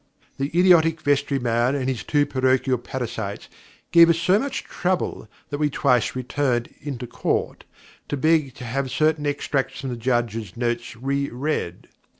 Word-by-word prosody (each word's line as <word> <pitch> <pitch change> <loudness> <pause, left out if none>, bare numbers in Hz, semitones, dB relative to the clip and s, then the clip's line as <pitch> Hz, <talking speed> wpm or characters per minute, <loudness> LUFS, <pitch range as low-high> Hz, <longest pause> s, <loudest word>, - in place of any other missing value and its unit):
The 135 - 0
idiotic 165 -3 +5
vestry 145 -1 +1
man 120 +1 +1
and 130 -2 -2
his 130 -3 -2
two 145 -1 +2
parochial 130 -2 +1
parasites 115 -5 -5 0.4
gave 170 0 +8
us 165 - +4
so 180 +4 +3
much 280 +2 -3
trouble, 180 - -2 0.2
that 145 - -3
we 150 -1 +2
twice 125 -5 +1
returned 125 -1 -1
into 135 -4 -5
Court, - - -2 0.4
to 145 - -1
beg 155 -3 +2
to 125 - -8
have 135 +3 -2
certain 155 +2 +1
extracts 145 -1 -2
from 135 -2 -4
the - - -3
Judge's 115 -4 -2
notes 120 -1 -2
reread. 140 - -2
135 Hz, 155 wpm, -23 LUFS, 120-150 Hz, 0.4 s, gave